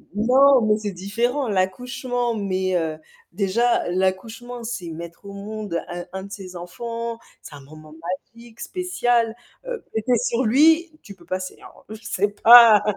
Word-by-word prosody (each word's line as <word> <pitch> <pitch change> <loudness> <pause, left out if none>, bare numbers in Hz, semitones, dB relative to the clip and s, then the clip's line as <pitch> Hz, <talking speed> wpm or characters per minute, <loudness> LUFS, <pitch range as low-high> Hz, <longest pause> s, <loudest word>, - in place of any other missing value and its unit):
Non, 260 +4 +5
mais 215 -1 +2
c'est 210 -2 -4
différent. 235 +9 -2
L'accouchement, 240 +5 -1
mais 190 -2 -1
heu, 160 -2 -1 0.3
déjà 210 +6 +1
l'accouchement, 220 +7 -2
c'est 220 -7 -5
mettre 170 +4 -9
au 200 - -8
monde 200 -3 -5
un 175 0 -6
un 190 0 -5
de 200 - -11
ses 190 -2 -9
enfants, 230 +6 -6 0.2
c'est 145 - -11
un 140 - -11
moment 155 +2 -14 0.4
magique, 235 0 -16
spécial, 245 -11 0 0.3
heu, 485 -3 -5
péter 225 +2 +1
sur 240 +2 0
lui, 320 +8 +4
tu 200 - -11
peux 175 - -20
passer 185 0 -4
alors, - - -16
heu, 220 - -7
c'est 205 +1 -2
pas 230 -3 +9
215 Hz, 155 wpm, -22 LUFS, 185-240 Hz, 0.4 s, pas